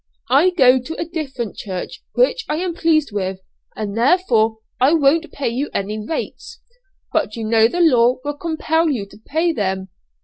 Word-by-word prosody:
'I 290 +8 +5
go 260 -3 +6
to 295 +6 -7
a 335 - -1
different 280 - -5
church, 185 -3 -6
which - - +2
I 300 - 0
am 350 +2 -2
pleased 315 -5 +1
with, 190 -2 -3 0.4
and 210 -2 -4
therefore 230 -5 +2 0.2
I 265 +5 +4
won't 320 +2 +2
pay 280 -4 -2
you 260 +5 -2
any 210 +2 -2
rates.' 330 - -5 0.5
'But 300 -10 0
you 230 - -5
know 225 0 +5
the 350 +9 -2
law 250 -6 +4
will 290 - -2
compel 320 +1 0
you 240 -9 -2
to 200 - -18
pay 325 +3 +1
them.' 190 -7 -2
270 Hz, 175 wpm, -20 LUFS, 220-320 Hz, 0.5 s, go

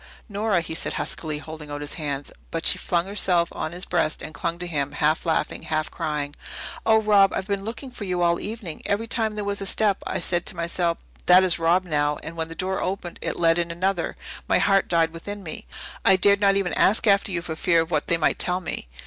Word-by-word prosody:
"Nora!" 205 -3 +1
he 160 - -6
said 160 - -2
huskily, 155 -2 -2
holding 155 0 -9
out 145 0 -5
his 145 - -3
hand. 145 -2 -4 0.2
But - - -4
she - - +3
flung 170 0 0
herself 185 -4 +1
on 155 - -4
his 180 +2 -5
breast 165 -3 0
and 155 - -7
clung 170 +2 -2
to 175 - -5
him, 145 -4 -2
half 155 +3 +1
laughing, 160 -2 0
half 155 0 -2
crying. 145 -1 -3 0.5
"Oh, 220 0 +6
Rob! 205 -3 +5
I've 190 - -2
been 200 -1 -2
looking 240 +5 -6
for 235 - -7
you 180 -2 0
all 170 0 +3
the - - -7
evening. 210 -7 -5
Every 205 +3 0
time 225 -3 -1
there 210 - -3
was 200 0 -1
a 195 - -2
step 205 0 +2
I - - -2
said 175 -1 0
to - - 0
myself, 170 0 0 0.3
'That 180 +1 +8
is 180 -2 +4
Rob, 170 +3 +3
now.' 150 -3 +1
And 165 - -7
when 160 -1 -2
the 165 - -9
door 190 +1 -2
opened 185 -2 -4
to - - -3
let 165 0 +3
in 170 0 -1
another, 175 +1 -1 0.3
my - - +4
heart 195 -1 +3
died 165 -1 +2
within 205 +4 -7
me. 160 -3 -7 0.4
I 195 - +6
dared 200 +2 +4
not 200 -1 +5
even 195 -3 0
ask 215 +4 +3
after 200 -1 +3
you 170 -2 -2
for 160 - -4
fear 170 +1 +3
of 165 +1 -5
what 150 -2 0
they 170 - +3
might 165 - +1
tell 180 0 +1
me. 175 - -5
175 Hz, 240 wpm, -24 LUFS, 160-195 Hz, 0.5 s, That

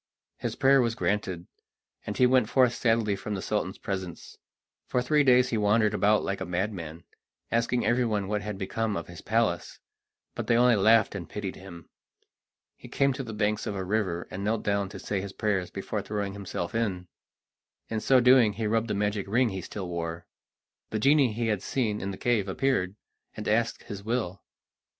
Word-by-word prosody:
His - - -3
prayer 135 0 +5
was 115 -2 0
granted, 95 -7 -1 0.6
and - - -3
he 125 - +5
went 125 -3 +3
forth 125 -2 +4
sadly 115 -4 +1
from 105 +1 -4
the 95 - -4
Sultan's 105 -3 -2
presence. 95 -4 -6 0.5
For 125 - 0
three 145 +4 +3
days 125 -1 +5
he 115 - 0
wandered 105 +1 +3
about 105 +1 +3
like 100 - -3
a - - -2
madman, 85 -3 -3 0.5
asking 115 +1 +1
everyone 115 -5 +1
what 105 +1 -1
had 105 0 -5
become 105 +2 -2
of 85 - -4
his 85 -2 -11
palace, 110 -6 0 0.6
but - - -5
they 115 - +4
only 125 -1 +5
laughed 110 +2 +4
and 90 -5 -6
pitied 100 -3 -5
him. 85 -4 -11 0.9
He - - -13
came 140 -1 +1
to 135 - -5
the 120 -4 -6
banks 105 0 -1
of 100 - -3
a 95 - -3
river, 95 -3 -1
and 95 +2 -5
knelt 110 +1 0
down 100 -1 0
to - - -9
say 100 -2 -3
his 100 0 -7
prayers 100 -5 -1
before 100 +2 -4
throwing 100 -1 -3
himself 95 -3 -5
in. 100 -6 -1 0.8
In 110 - -2
so 130 +4 +4
doing 125 -3 +6
he 110 +2 -3
rubbed 110 +1 +1
the 105 - -1
magic 105 -1 -1
ring 120 +4 +2
he 95 -2 -4
still 95 +2 -6
wore. 85 -1 -4 0.6
The 110 - -2
genie 135 +2 +4
he 115 +2 -2
had 105 -4 0
seen 110 -5 -1
in 95 - -3
the 95 - -5
cave 115 -5 +1
appeared, 95 -3 0 0.4
and 105 - -5
asked 115 +2 +1
his 100 -1 -7
will. 105 -4 -2
105 Hz, 190 wpm, -27 LUFS, 95-115 Hz, 0.9 s, doing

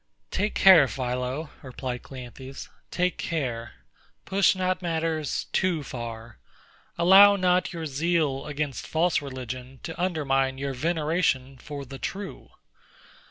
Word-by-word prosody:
Take 210 +1 -1
care, 180 -8 +8
PHILO, 125 +4 -3
replied 125 -2 -5
CLEANTHES, 130 +1 -9 0.2
take 180 0 0
care: 120 -8 -3 0.5
push 195 0 +3
not 185 0 -1
matters 160 -3 -1
too 175 -5 +1
far: 115 -3 -7 0.6
allow 195 +4 +8
not 180 -2 +2
your 165 -2 -5
zeal 150 -1 0
against 145 -2 -3
false 165 +1 +2
religion 130 -1 -7
to 165 +1 -5
undermine 135 -7 +1
your 135 0 -3
veneration 150 -2 0
for 140 +1 -7
the 135 +1 -9
true. 200 0 -6
145 Hz, 115 wpm, -26 LUFS, 130-175 Hz, 0.6 s, care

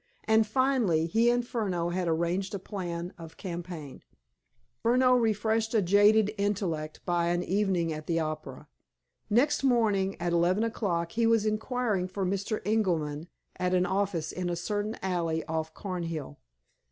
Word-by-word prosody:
And, 220 0 +3
finally, 235 -10 +2
he 225 +8 +3
and 240 0 +1
Furneaux 190 -8 -1
had 180 0 -1
arranged 170 +4 0
a - - -1
plan 175 -3 -5
of 165 -1 -10
campaign. 170 -6 -7 0.8
Furneaux 250 +2 +4
refreshed 225 -1 +1
a 220 - +5
jaded 205 +3 +4
intellect 180 -7 -2
by 175 -1 +1
an 175 +1 +1
evening 185 -4 0
at 155 0 -7
the 165 -1 +1
opera. 155 -1 -5 0.6
Next 275 +7 +2
morning, 210 -7 +2
at 175 0 -1
eleven 175 +5 +2
o'clock, 175 -7 -1
he 230 +3 +1
was 225 -2 +3
inquiring 215 -3 0
for 190 +1 -3
Mr. 200 +3 -2
Ingerman 170 -8 0 0.3
at 180 0 +1
an 180 0 +3
office 190 -4 -1
in 180 -1 -3
a 175 - -1
certain 205 +5 -2
alley 170 -4 -1
off 160 0 -3
Cornhill. 165 - -5
190 Hz, 150 wpm, -29 LUFS, 170-220 Hz, 0.8 s, a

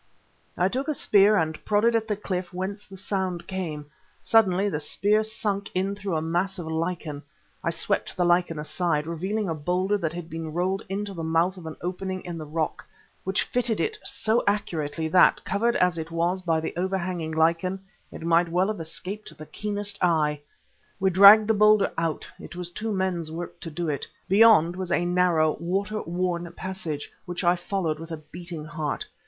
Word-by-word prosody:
I 180 - +3
took 260 +8 -2
a 305 - 0
spear 210 -2 +5
and 160 -3 -1
prodded 220 +3 +3
at 225 -1 +1
the 210 - 0
cliff 185 -3 -4
whence 190 +3 -5
the 195 - -11
sound 185 -3 -2
came. 170 -6 -4 0.3
Suddenly 200 -3 +3
the 150 -7 -1
spear 205 +8 +2
sunk 205 -2 -2
in 190 +2 0
through 200 -3 -3
a 155 - 0
mass 175 +4 -1
of 175 - -5
lichen. 160 -2 -3 0.4
I - - +1
swept 170 - -1
the 180 - +2
lichen 175 -2 +2
aside, 150 0 -1
revealing 190 +6 -2
a 165 - 0
boulder 180 +6 0
that 165 -3 -2
had 175 -1 -6
been 160 -2 -6
rolled 185 +3 0
into 200 +1 -3
the 170 - -6
mouth 165 +3 +2
of 175 -3 -9
an 160 - -6
opening 185 +1 -4
in 170 -2 -5
the 155 - -7
rock, 155 0 -2 0.4
which 190 +2 +1
it - - -13
fitted 250 - 0
so 220 +2 0
accurately 160 -6 -1
that, 180 +3 +5
covered 235 +3 +1
as 180 -2 +2
it 160 0 -5
was 170 +3 0
by 165 -3 +1
the 160 - -4
overhanging 180 -3 -2
lichen, 165 +4 +1 0.3
it - - -9
might 170 +1 +3
well 180 +4 +2
have 215 -5 -3
escaped 185 +6 -6
the 155 - -9
keenest 205 +1 -4
eye. 150 -4 +2 0.6
We 190 -1 +2
dragged 200 +3 +9
the 220 - +4
boulder 210 -1 +5
out; 165 -2 -2
it - - -10
was 175 -1 -3
two 220 +5 -4
men's 185 -5 -1
work 170 +2 -6
to 165 - -7
do 170 +2 -3
it. 145 -3 -2 0.2
Beyond 195 -5 +6
was 185 -1 -4
a 175 - +2
narrow, 175 -3 +2
water 200 +5 -1
worn 175 0 -2
passage, 175 -6 -5
which 175 +1 -3
I 175 0 +4
followed 175 -4 -2
with 165 +1 -8
a 160 - -4
beating 160 +1 -9
heart. 155 -2 -3
180 Hz, 190 wpm, -26 LUFS, 165-195 Hz, 0.6 s, dragged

